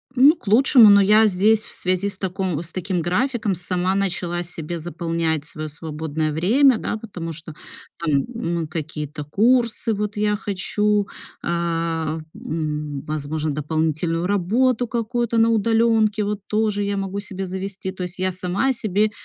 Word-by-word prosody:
Ну, 280 +6 +7
к 235 - -21
лучшему, 235 0 +7
но 200 0 +7
я 215 +3 +6
здесь 210 +3 +3
в - - -9
связи 185 +2 0
с 195 - -9
таком 185 -4 -2
с 165 - -9
таким 185 -1 -2
графиком 215 - 0
сама 180 +1 -1
начала 180 -3 -1
себе 170 -1 -5
заполнять 165 -2 -2
своё 155 -1 -5
свободное 155 0 -3
время, 230 - +4
да, 220 - -3
потому 175 -7 -6
что 160 0 -9 0.5
там, 150 -5 +1
ну, 170 -8 -2
какие-то 150 -1 -5
курсы 230 - +2
вот 210 +1 -3
я 210 0 +1
хочу, 205 0 0 0.4
а, 165 -2 -1 0.2
м, 150 -3 -4
возможно, 155 0 -2
дополнительную 160 +3 -1
работу 225 +6 +1
какую-то 235 0 -1
на 225 0 +5
удалёнке, 225 -1 +2
вот 205 0 -2
тоже 210 -1 0
я 200 0 -1
могу 195 0 -3
себе 195 -2 -5
завести. 190 +1 -5
То 185 -1 -6
есть 180 +1 -6
я 185 0 0
сама 185 +8 0
себе 215 -3 0
185 Hz, 155 wpm, -22 LUFS, 165-215 Hz, 0.5 s, Ну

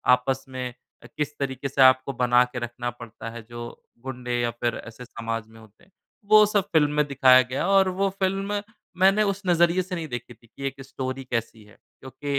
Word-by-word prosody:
आपस 135 +1 -3
में 130 -1 -4 0.4
अ, - - -13
किस 150 0 -3
तरीके 135 -1 -3
से 135 0 0
आपको 130 +1 +5
बना 125 0 +5
के 120 - -3
रखना 120 +1 -4
पड़ता 115 -1 -9
है 115 +1 -8
जो 120 0 -8 0.4
गुंडे 125 -2 -3
या 120 0 0
फिर 120 +1 -2
ऐसे 115 +2 -10
समाज 115 -2 -5
में 110 0 -17
होते 110 +7 -19
हैं, 195 - -25 0.3
वो 215 +1 +7
सब 205 -2 0
फ़िल्म 150 -2 +4
में 150 - +4
दिखाया 130 -2 +6
गया 130 +1 -2
और 195 -1 +4
वो 195 - +3
फ़िल्म 195 +2 -1 0.4
मैंने 195 +3 +4
उस 200 -1 -1
नजरिए 175 +1 +3
से 185 0 -5
नहीं 165 -2 -4
देखी 120 -2 -6
थी 115 +1 -24
कि 135 +4 -6
एक 135 0 -7
स्टोरी 130 0 -5
कैसी 115 -2 -3
है 105 0 -20 0.2
क्योंकि 140 +2 -5
130 Hz, 210 wpm, -25 LUFS, 120-170 Hz, 0.4 s, वो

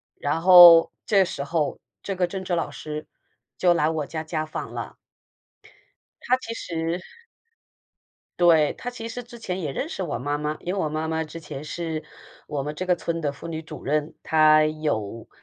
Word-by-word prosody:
然 155 +3 -2
后 175 -2 +9
这 200 -3 +4
时 140 - -4
候， 150 0 -1 0.2
这 195 - -4
个 180 -1 +1
政 190 +2 -5
治 180 -2 -1
老 165 - -2
师 150 0 -6 0.5
就 175 -1 +4
来 150 -2 +2
我 155 -3 -3
家 155 0 -5
家 155 0 -3
访 155 - -6
了。 - - -6 1.3
她 255 +1 +2
其 230 - -5
实 165 -4 -3 1.4
对， 165 -4 +5
她 245 - -5
其 230 -2 -7
实 245 +2 -5
之 240 0 -13
前 190 -5 -4
也 150 -6 -3
认 290 - -3
识 195 - -5
我 170 -9 -2
妈 145 +4 -2
妈， 150 +1 -2
因 180 - -3
为 200 - -2
我 160 - 0
妈 155 +1 -3
妈 160 0 -1
之 165 +2 -9
前 150 -3 -7
是 160 +1 -4 0.5
我 145 -2 -3
们 150 +2 -4
这 185 +5 -4
个 180 - +3
村 170 0 -3
的 145 -3 -2
妇 165 - -9
女 160 -1 -4
主 155 - -10
任， 150 +2 -1
她 155 -1 +5
有 145 -9 -3
160 Hz, 205 characters per minute, -24 LUFS, 150-180 Hz, 1.4 s, 后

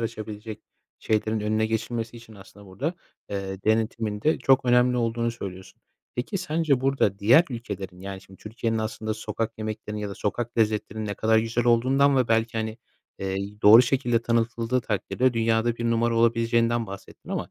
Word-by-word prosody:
açabilecek 110 -1 -6 0.4
şeylerin 110 0 0
önüne 110 +1 +1
geçilmesi 115 +1 -3
için 115 -1 -14
aslında 100 0 -15
burada, 130 - -3 0.4
eee, 95 -1 -4
denetimin 110 -1 0
de 155 - +2
çok 135 -1 +3
önemli 125 0 +4
olduğunu 115 0 0
söylüyorsun. 95 -5 -9 0.3
Peki, 125 +11 -3
sence 160 -6 +1
burada 135 -7 +1
diğer 120 +12 +6
ülkelerin, 100 -6 -6
yani, 95 0 -7
şimdi 95 -1 -17
Türkiye'nin 115 +1 -2
aslında 110 0 -3
sokak 110 +1 -4
yemeklerinin 110 -1 -5
ya 105 - -3
da 100 - -6
sokak 120 +4 -3
lezzetlerinin 110 0 0
ne 100 - -3
kadar 110 +1 +3
güzel 115 +1 0
olduğundan 130 +4 +4
ve 125 -2 +2
belki, 115 0 +1
hani, 110 +1 -4 0.4
eee, 95 0 -3 0.3
doğru 110 +4 +9
şekilde 120 -2 +1
tanıtıldığı 115 +1 0
takdirde 120 +3 0
dünyada 115 +1 +1
1 120 - -4
numara 115 0 +1
olabileceğinden 115 0 +2
bahsettin. 100 0 -11
Ama - - -3
115 Hz, 160 wpm, -25 LUFS, 105-120 Hz, 0.4 s, doğru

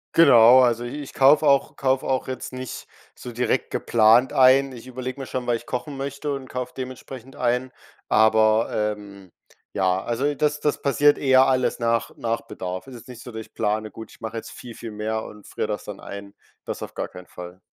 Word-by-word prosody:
Genau, 125 -5 +8
also 120 -1 +2
i 145 +5 -6
ich 140 - -10
kaufe 145 +3 +5
auch 140 -1 +3
kaufe 130 -1 0
auch 130 -1 -1
jetzt 130 0 -6
nicht 130 0 -7 0.3
so 125 - -9
direkt 120 +2 -1
geplant 115 +3 +3
ein. 135 +1 +5
Ich 125 0 -11
überlege 130 +1 -6
mir 135 - -5
schon, 130 -1 -4
weil 120 - +2
ich 120 - -15
kochen 135 +3 -5
möchte 140 +1 -4
und 135 -2 -7
kaufe 125 0 -5
dementsprechend 130 0 -8
ein, 125 0 -1 0.4
aber, 110 0 +4 0.3
ähm, 100 -3 -14 0.4
ja 95 -1 +1
also 130 +7 -1
das 150 +1 0
das 150 0 -1
passiert 145 +1 +3
eher 130 -1 +5
alles 130 -1 +1
nach 115 -1 0
nach 115 0 -2
Bedarf. 90 +5 -7
Es 130 - -10
ist 115 - -13
nicht 125 -2 -11
so, 125 - -10
dass 110 0 -6
ich - - -15
plane, 110 +1 -2
gut, 110 -1 -10
ich - - -19
mache 115 0 -5
jetzt - - -7
viel, 120 -2 -10
viel 115 -1 -8
mehr 110 +1 -3
und 105 -1 -12
friere - - -4
das 105 -1 -4
dann 105 -2 -8
ein. 100 0 -9 0.3
Das - - -5
auf - - -7
gar - - -3
keinen 90 0 -12
Fall. 90 +1 -10
125 Hz, 210 wpm, -23 LUFS, 110-130 Hz, 0.4 s, Genau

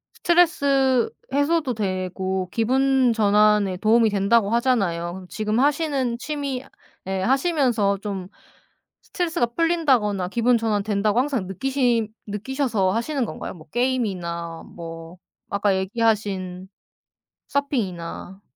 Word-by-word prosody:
스트레스 280 -7 +3 0.2
해소도 285 -1 +1
되고, 185 -2 -2
기분 260 +1 +2
전환에 210 -2 +3
도움이 220 +3 +4
된다고 200 +1 +2
하잖아요. 190 -7 0
지금 215 +1 -1
하시는 280 -4 +1
취미 280 -1 -4 0.4
예 190 0 -1
하시면서 255 - +2
좀 195 -3 -5 0.8
스트레스가 340 -7 -1
풀린다거나 265 - +1
기분 235 +4 +2
전환된다고 210 -1 0
항상 260 -7 -1
느끼시 240 +2 0 0.2
느끼셔서 215 -1 -1
하시는 240 +6 -1
건가요? - - -6
뭐 160 -3 -15
게임이나 180 -10 -2
뭐 165 +1 -9 0.3
아까 200 -1 +1
얘기하신 190 -3 -1 0.8
서핑이나. 195 - -3
220 Hz, 275 characters per minute, -23 LUFS, 190-265 Hz, 0.8 s, 도움이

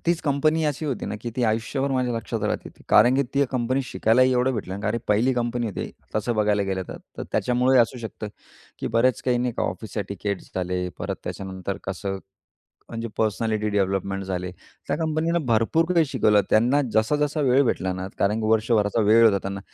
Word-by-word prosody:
तीच 170 -1 +2
कंपनी 155 +2 +1
अशी 150 +1 -1
होती 135 -4 -3
ना - - -3
की 120 - -5
ती 125 - 0
आयुष्यभर 115 +5 0
माझ्या 125 -2 0
लक्षात 115 -1 -4
राहिली 105 - -2
ती. - - -18
कारण 125 +2 +6
की 140 - +3
ती 140 0 +4
कंपनी 130 +1 0
शिकायलाही 130 +1 +3
एवढं 125 +1 +2
भेटलं 95 -4 -4
ना. 100 - -6
कारण 110 +2 0
पहिली 115 +5 +3
कंपनी 120 0 -1
होती 105 - -4 0.3
तसं 110 +3 0
बघायला 105 -1 +2
गेलं 95 -1 -2
तर. - - -6 0.2
तर - - -3
त्याच्यामुळे 125 +2 +2
ही - - +8
असू 125 +2 -4
शकतं 110 -2 -6 0.5
की - - -4
बरेच 125 0 +3
काही 125 -1 +1
नाही 125 0 -1
का - - -1
ऑफिस 110 - -4
एटिकेटस 100 0 -4
झाले. 90 0 -2
परत - - -3
त्याच्यानंतर 95 0 -5
कसं 95 +1 -4 0.7
म्हणजे 115 0 -4
पर्सनॅलिटी 110 0 0
डेव्हलपमेंट 95 -1 -1
झाले. 90 -1 -3 0.4
त्या - - 0
कंपनीनं 160 0 0
भरपूर 115 +8 +2
काही 165 -2 +4
शिकवलं, 110 -7 +3
त्यांना 125 +7 +4
जसा-जसा 150 +7 +1
वेळ 135 0 +4
भेटला 95 -5 0
ना, 95 +1 -5
कारण 105 +3 +2
की 110 - -1
वर्षभराचा 110 -1 +2
वेळ 110 +2 +6
होता 105 -3 +5
त्यांना. 100 0 -4
115 Hz, 195 wpm, -24 LUFS, 100-130 Hz, 0.7 s, ही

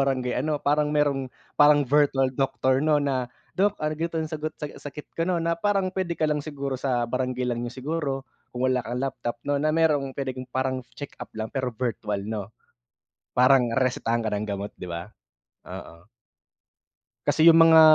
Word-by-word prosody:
barangay 130 -2 +1
ano, 150 +4 0
parang 150 +1 +1
merong 145 -3 +1 0.3
parang 145 -1 +7
virtual 135 -1 +3
doctor 130 0 +1
'no, 155 0 +3
na, 135 -4 0 0.2
"Dok, 205 +2 +2
argu 155 +2 -1
'tong 160 -1 -2
sagot 155 0 -4
sa - - -6 0.2
sakit 145 +1 -9
ko, 165 +2 -1
'no?" 180 - +2
na 170 0 0
parang 195 -3 +1
puwede 185 -3 -2
ka 155 - 0
lang 150 -1 +1
siguro 140 -3 -4
sa 125 -3 +1
barangay 125 +1 -2
lang 120 -1 -1
niyo 120 - -3 0.2
siguro, 145 -4 -2 0.2
kung 125 +1 -3
wala 125 - +1
kang 120 +1 -5
laptop 125 -2 -3
'no, 145 0 0
na 155 +1 +1
merong 145 -5 +2
puwedeng 130 -2 -4
parang 130 +1 -1 0.2
check-up 145 - -8
lang 110 0 -4
pero 130 -2 -1
virtual, 110 -4 -3
'no? 105 -2 -4 0.9
Parang 125 0 +5
resetahan 120 -3 +1
ka 110 - -1
ng 105 +1 -2
gamot, 100 0 -4
'di 90 - -6
ba? 85 0 -4 0.7
Oo. 85 +6 -10 1.2
Kasi 160 - +4
yung 165 0 +8
mga 160 0 +8
135 Hz, 175 wpm, -26 LUFS, 125-150 Hz, 1.2 s, yung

